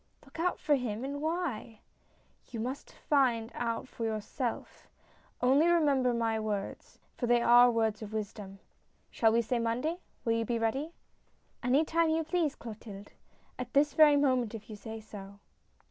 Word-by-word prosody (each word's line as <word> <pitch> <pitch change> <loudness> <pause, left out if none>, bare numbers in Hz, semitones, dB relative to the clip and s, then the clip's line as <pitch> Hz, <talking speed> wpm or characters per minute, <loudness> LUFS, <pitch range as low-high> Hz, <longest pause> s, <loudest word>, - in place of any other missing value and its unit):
" - - -26
Look 275 +3 -13
out 360 +2 +1
for 300 - +1
him? 240 -4 -1
And 285 +1 -4
why? 315 -9 -3 0.3
" - - -37
"You 235 - -6
must 255 +5 -5
find 240 -6 +1
that - - -19
out 230 +1 -2
for 235 - -7
yourself, 225 +2 -4 0.5
only 270 +6 +4
remember 285 -7 +3
my 230 -2 0
words, 210 -2 -4 0.2
for 245 - -2
they 240 0 +4
are 240 +1 +7
words 225 -2 0
of 215 -1 -7
wisdom. 205 -2 -6 0.5
Shall 225 -1 +3
we 235 +1 +2
say 235 +2 -1
Monday? 250 +9 -1 0.3
Will 230 - +2
you 230 0 0
be 235 +1 -1
ready? 265 +9 -1 0.2
" - - -40
" - - -40
Any 265 +6 +3
time 330 +1 +2
you 320 +1 +1
please, 320 -2 0
Clotilde; 210 -3 -10 0.6
this 290 +1 +3
very 305 -2 +7
moment, 255 -5 +1
if 220 0 -10
you - - -6
say 220 +2 -8
so." 200 -2 -11
240 Hz, 175 wpm, -31 LUFS, 220-285 Hz, 0.6 s, are